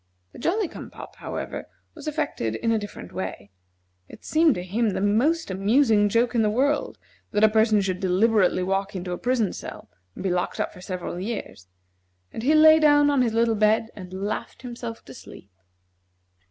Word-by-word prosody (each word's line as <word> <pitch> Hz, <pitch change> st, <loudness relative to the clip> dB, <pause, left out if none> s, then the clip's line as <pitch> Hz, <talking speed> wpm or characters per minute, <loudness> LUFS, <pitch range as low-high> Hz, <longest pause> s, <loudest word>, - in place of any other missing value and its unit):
The -, -, -13 dB
Jolly 385 Hz, -, 0 dB
cum -, -, -10 dB
pop, -, -, -12 dB
however, -, -, -6 dB, 0.2 s
was 305 Hz, -2 st, -11 dB
affected 290 Hz, -, -2 dB
in 230 Hz, -, -1 dB
a 225 Hz, -, +2 dB
different 205 Hz, -, -9 dB
way. 95 Hz, +1 st, -6 dB, 0.6 s
It -, -, -14 dB
seemed 315 Hz, -2 st, +3 dB
to 180 Hz, -, -4 dB
him 215 Hz, +5 st, 0 dB
the 195 Hz, -, -2 dB
most 230 Hz, -, +1 dB
amusing 205 Hz, +2 st, +3 dB
joke 235 Hz, +4 st, +1 dB
in 235 Hz, -, +2 dB
the 215 Hz, -, +2 dB
world 280 Hz, +7 st, 0 dB, 0.3 s
that 210 Hz, +1 st, 0 dB
a -, -, +9 dB
person 220 Hz, -1 st, +3 dB
should 185 Hz, -2 st, -2 dB
deliberately 190 Hz, 0 st, +2 dB
walk 195 Hz, +2 st, -2 dB
into 180 Hz, -1 st, -4 dB
a 180 Hz, -, -2 dB
prison 245 Hz, -6 st, 0 dB
cell -, -, -9 dB, 0.2 s
and -, -, -7 dB
be 190 Hz, -, 0 dB
locked 180 Hz, 0 st, -2 dB
up -, -, -2 dB
for 180 Hz, -, -13 dB
several 180 Hz, -1 st, -5 dB
years; 195 Hz, -, -6 dB, 0.6 s
and -, -, -6 dB
he 290 Hz, +6 st, +3 dB
lay 315 Hz, 0 st, +7 dB
down 290 Hz, -1 st, +5 dB
on 280 Hz, -2 st, +2 dB
his 235 Hz, -3 st, +1 dB
little 230 Hz, 0 st, +3 dB
bed 215 Hz, +1 st, +2 dB
and 185 Hz, -3 st, -10 dB
laughed 200 Hz, +6 st, -5 dB
himself 235 Hz, -2 st, -7 dB
to -, -, -11 dB
sleep. 100 Hz, -, -13 dB
220 Hz, 190 wpm, -24 LUFS, 190-255 Hz, 0.6 s, a